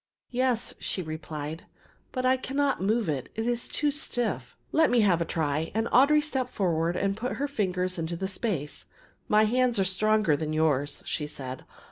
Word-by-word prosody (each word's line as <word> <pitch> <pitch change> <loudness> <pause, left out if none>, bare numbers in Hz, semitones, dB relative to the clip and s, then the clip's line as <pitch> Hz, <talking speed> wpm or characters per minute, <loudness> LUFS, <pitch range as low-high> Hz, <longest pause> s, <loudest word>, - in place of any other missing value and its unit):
"Yes," 250 -2 0
she 185 - -3
replied, 155 0 -6 0.5
"but 255 -1 -2
I 255 +1 +5
cannot 275 0 0
move 215 +2 +1
it; 140 -5 -2
it 225 - -2
is 240 0 0
too 295 -1 +1
stiff." 235 - -2
"Let 320 0 +4
me 245 -2 +4
have 180 -5 +3
a - - +1
try," 155 -1 -1
and 225 +1 +1
Audry 295 +4 +5
stepped 265 -4 -1
forward 170 -3 +1
and 195 +2 0
put 245 +4 -3
her 285 - -1
fingers 185 -7 -1
into 165 +1 -2
the 190 - -2
space. 185 - -3 0.4
"My 210 +1 +5
hands 245 +2 +2
are 195 - +3
stronger 215 -2 +3
than 155 +1 -3
yours," 145 -2 +1
she 150 - -2
said. 130 -3 -7
195 Hz, 180 wpm, -28 LUFS, 160-245 Hz, 0.5 s, I